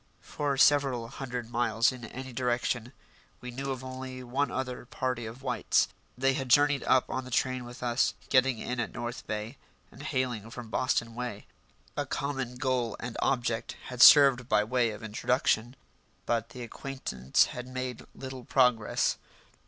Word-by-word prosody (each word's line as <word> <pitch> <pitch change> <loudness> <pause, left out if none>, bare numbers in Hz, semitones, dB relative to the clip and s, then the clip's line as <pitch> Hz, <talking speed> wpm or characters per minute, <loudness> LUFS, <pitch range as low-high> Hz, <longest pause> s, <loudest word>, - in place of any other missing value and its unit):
For 145 -2 -2
several 135 -5 +4
hundred 125 -3 -5
miles 115 -1 +2
in 125 -2 -8
any 130 +2 -8
direction 120 -1 -1 0.5
we 125 - -7
knew 135 +3 -4
of 130 -1 -3
only 130 0 -7
one 135 +4 0
other 125 -1 -4
party 125 -3 -2
of 120 +4 -10
whites. 125 -2 +2 0.3
They 135 +1 +3
had 130 -1 -3
journeyed 145 +1 +5
up 130 - +4
on 130 - -3
the 125 - -9
train 130 0 0
with 120 +1 -9
us, 120 0 +1
getting 130 -2 +3
in 125 +2 -4
at 115 - -3
North 120 0 -5
Bay, 105 +5 -4 0.3
and 130 - -13
hailing 130 -7 -2
from 115 -1 -8
Boston 115 -1 0
way. 120 -3 -5 0.5
A - - -2
common 135 -3 -3
goal 125 -3 -1
and 115 0 -5
object 120 -3 0
had 125 -1 -3
served 135 -4 +8
by 105 -1 +4
way 120 +1 +1
of 105 0 -8
introduction. 115 +2 0 0.5
But 115 -1 0
the 125 +1 -8
acquaintance 115 - 0
had 125 0 -6
made 130 -1 -5
little 130 -1 -7
progress. 125 -4 +2
125 Hz, 160 wpm, -29 LUFS, 120-130 Hz, 0.5 s, served